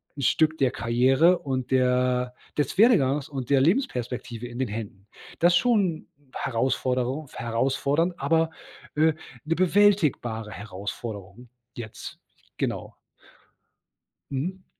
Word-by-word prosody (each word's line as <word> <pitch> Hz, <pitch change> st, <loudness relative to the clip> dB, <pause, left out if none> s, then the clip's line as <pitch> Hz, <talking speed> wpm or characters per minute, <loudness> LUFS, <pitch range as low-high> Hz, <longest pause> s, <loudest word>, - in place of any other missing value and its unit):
'n 140 Hz, -, -6 dB
Stück 155 Hz, +4 st, +2 dB
der 130 Hz, -4 st, +2 dB
Karriere 130 Hz, +9 st, +3 dB
und 130 Hz, -3 st, -3 dB
der 125 Hz, -1 st, +2 dB, 0.2 s
des 145 Hz, +3 st, -1 dB
Werdegangs 150 Hz, -, +4 dB
und 135 Hz, -4 st, -5 dB
der 135 Hz, -1 st, +5 dB
Lebensperspektive 125 Hz, -, -1 dB
in 120 Hz, 0 st, -9 dB
den 130 Hz, -, 0 dB
Händen. 105 Hz, -2 st, -7 dB, 0.3 s
Das 175 Hz, +1 st, +5 dB
schon 205 Hz, -9 st, +2 dB, 0.3 s
Herausforderung 130 Hz, +3 st, -1 dB
f -, -, -17 dB
herausfordernd, 135 Hz, +8 st, 0 dB
aber, 160 Hz, +3 st, +2 dB, 0.4 s
äh, 160 Hz, +1 st, +4 dB, 0.3 s
'ne 165 Hz, +2 st, 0 dB
bewältigbare 165 Hz, -, +2 dB
Herausforderung, 100 Hz, +2 st, -7 dB, 0.3 s
jetzt. 115 Hz, -2 st, -8 dB, 0.4 s
Genau. -, -, -3 dB, 1.3 s
Mhm. 180 Hz, +8 st, -4 dB
130 Hz, 110 wpm, -26 LUFS, 120-160 Hz, 1.3 s, der